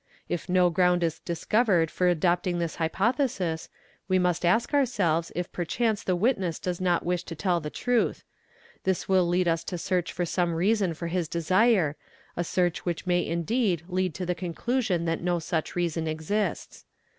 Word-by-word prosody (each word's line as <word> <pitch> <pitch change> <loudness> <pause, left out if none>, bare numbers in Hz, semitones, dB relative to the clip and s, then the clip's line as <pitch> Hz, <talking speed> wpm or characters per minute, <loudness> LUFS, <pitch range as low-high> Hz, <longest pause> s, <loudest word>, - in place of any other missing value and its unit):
If 175 +1 -4
no 180 -1 +4
ground 180 0 +3
is 165 -1 -1
discovered 175 0 +1
for 180 - +1
adopting 175 +1 +1
this 170 -2 -3
hypothesis, 190 - 0 0.4
we 185 -1 +3
must 180 -1 +1
ask 225 - +2
ourselves 195 - +1
if 175 0 -3
perchance 210 +5 -1
the 185 - 0
witness 190 -5 +1
does 180 0 -4
not 175 -2 +1
wish 180 0 0
to 165 - -6
tell 175 +1 +1
the 150 -2 -5
truth; 245 +7 0 0.6
this 190 -1 0
will 185 -2 +3
lead 175 +1 +1
us 165 0 +1
to 180 - -4
search 180 0 -1
for 175 - -2
some 175 0 0
reason 190 0 +1
for 170 - -6
his 170 0 -1
desire, 180 0 +2 0.4
a 175 - -1
search 175 0 0
which 175 0 -3
may 175 -1 +2
indeed 175 +2 0
lead 185 -3 -1
to 180 - -3
the 180 - 0
conclusion 180 +2 -1
that 165 -1 -1
no 175 0 +1
such 160 -1 -3
reason 165 -2 -1
exists. 160 +7 -2
175 Hz, 175 wpm, -27 LUFS, 170-190 Hz, 0.6 s, no